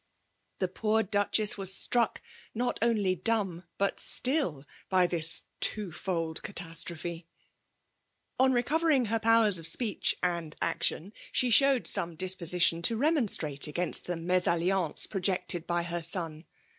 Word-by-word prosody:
The 185 - -1
poov 215 +2 -1
DuchesB 205 0 +2
was 190 -1 +5
stracfc, 230 +3 +1 0.4
not 245 +2 -2
oaly 210 -5 +1
dumb 195 -6 -1
bat 200 0 -1
still, 250 - -3 0.2
by 185 -1 +3
this 165 -2 +3 0.2
twofold 175 -4 -2
catastrophe! 170 -2 -6 1.1
On 260 0 +4
reeovering 270 0 +1
her 225 +1 0
powers 220 -4 +4
of 165 - -2
speeeh 225 +1 0
and 170 -3 -2
actieiiy 190 +6 -1 0.2
she 250 -1 +1
showed 275 +1 +4
some 170 -1 +1
disposition 180 -1 +3
to 225 +6 +2
r^non^ 290 -3 +1
strate 145 -3 0
against 175 +4 0
the 175 - -3
mesalliance 180 0 +1
projected 180 -3 -2
by 175 0 -1
her 170 0 -4
sen. 165 -2 -3
185 Hz, 130 wpm, -28 LUFS, 170-225 Hz, 1.1 s, was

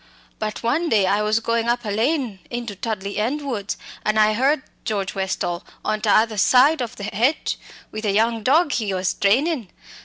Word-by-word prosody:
But 215 +1 -4
one 310 +9 +1
day 205 -6 +3
I 200 +2 +2
was 215 +1 +2
going 230 0 0
up 240 0 0
a 210 - -2
lane 235 -1 0
into 240 -4 -5
Tudley 200 -1 -4
End 270 +8 -1
woods, 215 -8 -3 0.3
an' 215 0 +1
I 215 0 +5
heard 265 +5 +2 0.2
George 200 -3 -2
Westall 190 -2 -2 0.2
on 215 0 -1
tother 215 +1 +3
side 260 +8 +5
of 235 -2 -4
the 205 - -8
hedge 245 +9 0 0.3
with 215 +1 -5
a 205 - +2
young 225 +2 +2
dog 295 +8 +3
he 210 -7 -1
was 185 0 0
training. 245 - +1
220 Hz, 185 wpm, -22 LUFS, 205-250 Hz, 0.3 s, I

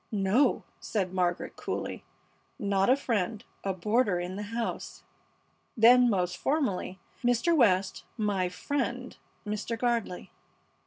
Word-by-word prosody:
"No," 210 +6 +2 0.2
said 190 -4 -2
Margaret, 180 -1 -1
coolly, - - -4 0.5
"not 200 0 +1
a 255 - +7
friend 220 -6 -2 0.2
a 195 - 0
boarder 205 +1 +1
in 180 +1 -4
the 205 - -4
house." 230 0 -4 0.7
Then 245 +2 +7
most 180 -3 0
formally, 210 -10 -1 0.2
"Mr. 245 +8 +3
West, 195 - +3
my 200 -4 0
friend 250 +4 -3 0.3
Mr. 210 +2 -3
Gardley." 235 -6 -1
210 Hz, 115 wpm, -29 LUFS, 185-245 Hz, 0.7 s, a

